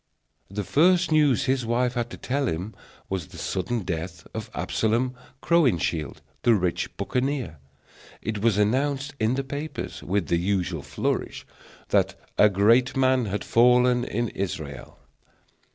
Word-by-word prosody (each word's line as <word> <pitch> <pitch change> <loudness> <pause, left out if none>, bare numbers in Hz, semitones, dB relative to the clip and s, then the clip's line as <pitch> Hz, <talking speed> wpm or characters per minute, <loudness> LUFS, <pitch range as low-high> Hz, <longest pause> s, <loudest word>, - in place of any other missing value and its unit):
The 100 +2 -3
first 175 - +3
news 145 -4 +3
his 130 -1 +1
wife 120 +2 +1
had 120 -1 -2
to - - -9
tell 140 +1 -1
him 90 +6 -3 0.3
was 95 -5 -3
the - - -13
sudden 110 +6 -2
death 85 -2 -5
of 110 -1 -5
Absalom 120 +3 0 0.3
Crowninshield, 100 - +1 0.2
the 120 - +4
rich 90 -3 -2
buccaneer. 130 - -2 0.6
It 110 -2 -3
was 110 -2 +3
announced 135 +6 +1
in 110 +3 +2
the 135 - -1
papers, 145 +4 -5
with 100 +2 -1
the 85 - +1
usual 90 -3 -1
flourish, - - -3 0.4
that - - +2 0.2
"A 105 - +7
great 115 +7 +3
man 130 -2 +3
had 105 0 -3
fallen 125 +1 +4
in 120 0 -2
Israel." 75 -9 -5
115 Hz, 140 wpm, -25 LUFS, 95-130 Hz, 0.6 s, A